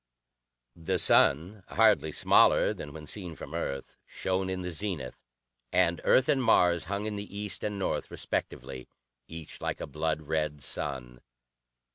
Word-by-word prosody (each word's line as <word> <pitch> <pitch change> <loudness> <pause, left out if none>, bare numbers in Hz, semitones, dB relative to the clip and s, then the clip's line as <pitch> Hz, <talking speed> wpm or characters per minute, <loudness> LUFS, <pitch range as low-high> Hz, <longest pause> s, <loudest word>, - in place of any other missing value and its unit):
The 80 -1 -1
sun, 85 +9 +4
hardly 110 -8 +3
smaller - - +4
than 75 - -8
when 75 +1 -9
seen 90 -2 -6
from - - -9
Earth, 70 0 -4
shone 95 0 -2
in 95 -1 -3
the 90 - -4
zenith, 80 -7 -3 0.5
and - - +2
Earth 130 - +4
and 135 - +2
Mars 90 -8 +3
hung 100 +4 -3
in 105 -1 -3
the 100 0 -7
east 105 -2 -4
and 105 -1 -2
north 95 - -2
respectively, 65 -2 -4 0.4
each 80 -1 -9
like - - -3
a - - -4
blood 80 +2 -2
red 75 -2 -2
sun. 60 -4 -4
85 Hz, 150 wpm, -29 LUFS, 75-100 Hz, 0.5 s, sun